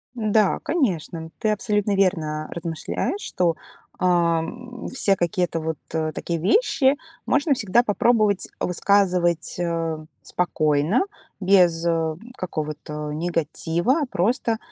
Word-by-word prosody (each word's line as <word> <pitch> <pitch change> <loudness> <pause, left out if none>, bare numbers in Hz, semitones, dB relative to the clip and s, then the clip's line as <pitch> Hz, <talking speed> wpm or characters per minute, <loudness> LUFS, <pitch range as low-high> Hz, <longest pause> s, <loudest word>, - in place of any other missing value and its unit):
Да, 215 -3 +2
конечно, 175 - -1
ты 220 - +1
абсолютно 210 -1 +1
верно, 160 -6 +1
а, - - -15
размышляешь, 170 - -3
что, 175 - 0 0.4
ам, 180 +8 0
все 205 -6 +2
какие-то 175 -2 0
вот, 160 -1 -3 0.2
э, 155 -1 0
такие 170 +2 -3
вещи 270 - +3 0.3
можно 285 +1 +2
всегда 235 -1 +3
попробовать 215 -2 +2
высказывать, 180 -2 +2
э, 165 -2 -2 0.2
спокойно, 155 - +1 0.4
без, 180 -4 +4
э, 165 -2 +1 0.2
какого-то 150 -3 -5
негатива, 170 - 0
просто 225 +4 +1
180 Hz, 105 wpm, -23 LUFS, 165-215 Hz, 0.4 s, без